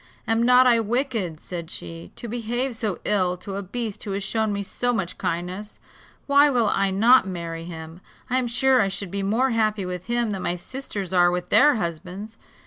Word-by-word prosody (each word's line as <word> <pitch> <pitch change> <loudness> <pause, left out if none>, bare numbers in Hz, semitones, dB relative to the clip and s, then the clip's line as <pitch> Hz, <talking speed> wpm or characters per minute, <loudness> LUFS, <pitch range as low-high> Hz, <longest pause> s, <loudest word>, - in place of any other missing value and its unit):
"Am 225 0 +2
not 250 +2 +6
I 240 -2 +5
wicked," 225 - -1
said 170 -2 -7
she, 165 0 -7
"to 235 - -7
behave 240 +2 -2
so 215 -6 -2
ill 185 -3 +2
to 195 +2 -7
a 200 - -2
beast 215 +2 -4
who 200 - -4
has 200 0 -2
shown 220 +2 0
me 200 0 -2
so 245 +5 -1
much 190 -6 -3
kindness; 180 +5 -4 0.5
why 285 +1 +5
will 240 -6 +2
I 195 0 +1
not 220 +3 +5
marry 165 -2 -5
him? 165 0 -9 0.3
I 255 0 +1
am 250 - -1
sure 255 +1 +3
I 200 - +2
should 195 -1 -5
be 200 0 -2
more 230 +7 +1
happy 215 -3 +1
with 180 0 -5
him 240 -2 0
than 195 -2 -3
my 175 - -1
sisters 200 -2 -6
are 175 -1 +5
with 180 0 -3
their 295 0 +6
husbands. 185 +4 -5
205 Hz, 205 wpm, -24 LUFS, 180-240 Hz, 0.5 s, not